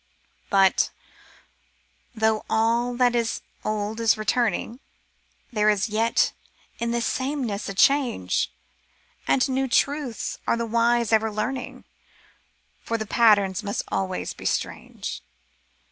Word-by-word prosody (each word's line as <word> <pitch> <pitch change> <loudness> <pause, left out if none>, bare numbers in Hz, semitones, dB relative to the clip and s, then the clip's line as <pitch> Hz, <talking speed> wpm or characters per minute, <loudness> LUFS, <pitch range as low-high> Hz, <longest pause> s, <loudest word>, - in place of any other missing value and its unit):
But 195 -1 +4 0.6
— - - -40
though 220 -1 +1
all 235 +2 +1
that 245 0 +3
is 235 -2 -1 0.2
old 215 +1 -2
is 225 -2 +3
returning. 230 +2 0 0.7
There 210 -1 +3
is 210 +1 +1
yet 225 +2 +2 0.5
in 235 - -1
this 235 0 0
sameness 260 -7 -2
a 195 - -5
change; 240 - +2 0.8
And 260 - +3
new 265 0 0
truths 275 -1 0
are - - +2
the 235 - -1
wise 235 0 +2
ever 220 0 +3
learning. 245 +5 -4 1.0
For 230 - -2
the 220 - -4
patterns 205 -4 +3
must 205 -1 -3
always 185 -1 -2
be - - -12
strange. - - -3
230 Hz, 120 wpm, -24 LUFS, 215-240 Hz, 1.0 s, But